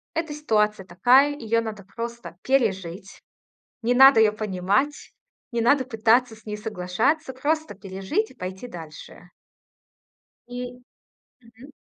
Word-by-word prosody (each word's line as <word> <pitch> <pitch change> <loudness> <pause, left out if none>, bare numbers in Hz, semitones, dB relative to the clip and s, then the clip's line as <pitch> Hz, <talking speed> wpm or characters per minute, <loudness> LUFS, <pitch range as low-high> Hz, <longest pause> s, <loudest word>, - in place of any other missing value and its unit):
эта 325 -2 -2
ситуация 215 -9 0
такая, 250 +11 +4
её 230 -4 0
надо 215 -3 -6
просто 235 -5 -6
пережить. 195 -8 -1 0.6
Не 240 +2 +2
надо 270 -2 +8
её 215 -1 +5
понимать, 210 +6 -1 0.4
не 235 -2 -1
надо 260 +4 +3
пытаться 230 0 +2
с 220 - -21
ней 210 0 -4
соглашаться. 220 - -1
Просто 310 +1 -1
пережить 195 - -3
и - - -16
пойти 190 +6 -7
дальше. 165 -1 -11 1.2
И 245 0 -7 0.6
Мгм. 235 +4 -16
230 Hz, 120 wpm, -24 LUFS, 195-260 Hz, 1.2 s, надо